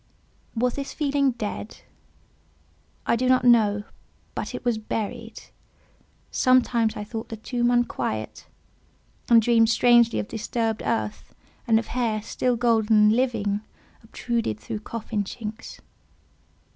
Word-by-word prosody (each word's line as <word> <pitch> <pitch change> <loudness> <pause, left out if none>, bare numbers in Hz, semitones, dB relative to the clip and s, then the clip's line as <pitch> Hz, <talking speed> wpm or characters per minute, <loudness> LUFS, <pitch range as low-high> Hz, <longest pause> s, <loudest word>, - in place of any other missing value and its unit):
Was 245 +1 +1
this 275 -1 -5
feeling 280 -3 +1
dead? 210 -1 -6 1.2
I - - +2
do 255 +2 0
not 255 -1 +4
know, 210 -4 +4 0.5
but - - -5
it - - -8
was 235 -3 +1
buried. 225 +1 -5 0.9
Sometimes 240 -3 +2
I 210 - -4
thought 220 +1 -6
the 225 - -6
tomb 240 +2 -1
unquiet, 240 - -1 0.8
and 235 -1 +8
dreamed 225 0 +4
strangely 235 0 +4
of - - -2
disturbed 225 0 -2
earth, 220 -2 -3 0.3
and 225 -1 +5
of 225 - -1
hair, 225 -4 -1
still 250 +2 0
golden, 225 -2 +3
and 210 +1 +5
living, 220 -5 0 0.4
obtruded 225 - -3
through 110 - -5
coffin 215 -1 -4
chinks. 220 +2 -8
230 Hz, 125 wpm, -24 LUFS, 215-240 Hz, 1.2 s, and